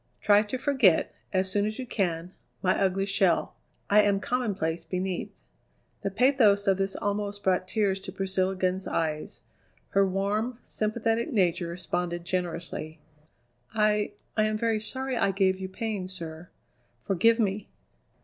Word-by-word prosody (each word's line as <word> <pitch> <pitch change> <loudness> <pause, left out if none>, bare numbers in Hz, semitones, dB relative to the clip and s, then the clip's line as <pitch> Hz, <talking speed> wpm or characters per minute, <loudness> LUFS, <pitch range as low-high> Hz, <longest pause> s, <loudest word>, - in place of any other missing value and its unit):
Try 205 0 +5
to 215 +4 -4
forget, 255 - +3 0.2
as 190 -1 +1
soon 205 +1 +1
as 215 - -4
you 260 - -4
can, 180 -6 -1 0.3
my 185 - +3
ugly 195 0 +1
shell; 195 -3 +2 0.3
I 210 +1 +6
am 200 -1 +2
commonplace 200 -9 -1
beneath." 185 0 -3 0.7
The - - -1
pathos 215 -2 +4
of 195 -1 +2
this 195 0 -1
almost 205 0 -2
brought 185 -1 +1
tears 200 -2 +1
to - - -8
Priscilla 190 0 0
Glenn's 185 0 -1
eyes. 155 -2 -2 0.5
Her 195 - +3
warm, 200 +5 -1
sympathetic 225 +2 -1
nature 175 -4 +1
responded 175 0 -3
generously. 170 -3 -3 0.8
"I 210 -1 +2 0.2
I 215 - +3
am 215 0 0
very 225 -1 0
sorry 260 +3 -1
I 225 - +2
gave 190 -1 +2
you 190 0 -5
pain, 210 -2 -3
sir. 170 -2 -6 0.5
Forgive 225 +5 +3
me!" 205 -1 -1
195 Hz, 145 wpm, -27 LUFS, 185-215 Hz, 0.8 s, I